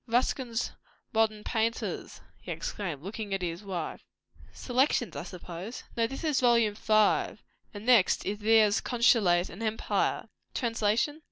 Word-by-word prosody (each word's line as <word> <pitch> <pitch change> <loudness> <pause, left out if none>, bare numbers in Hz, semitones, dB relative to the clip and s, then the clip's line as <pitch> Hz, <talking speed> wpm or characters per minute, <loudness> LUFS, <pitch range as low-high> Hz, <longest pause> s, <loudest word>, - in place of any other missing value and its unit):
"Ruskin's 240 0 0 0.4
'Modern 220 -1 +1
Painters'!" 225 0 -2 0.2
he - - -7
exclaimed, 165 -8 -4
looking 205 +1 -4
at 190 - -4
his 170 +1 -3
wife. 180 -5 -5 0.5
"Selections, 255 0 0
I 140 - -3
suppose." 180 +5 -8
"No, 230 -1 +2
this 270 +5 -7
is 305 -5 +2
Vol. 235 -4 +4
5. 215 0 +2 0.3
And 205 -2 -9
the - - +6
next 210 -6 +3
is 205 +2 -2
Thiers' 215 -1 +4
'Consulate 215 -8 +3
and 195 - -10
Empire'!" 220 0 -1 0.3
"Translation." 230 +4 0
220 Hz, 140 wpm, -29 LUFS, 195-235 Hz, 0.5 s, the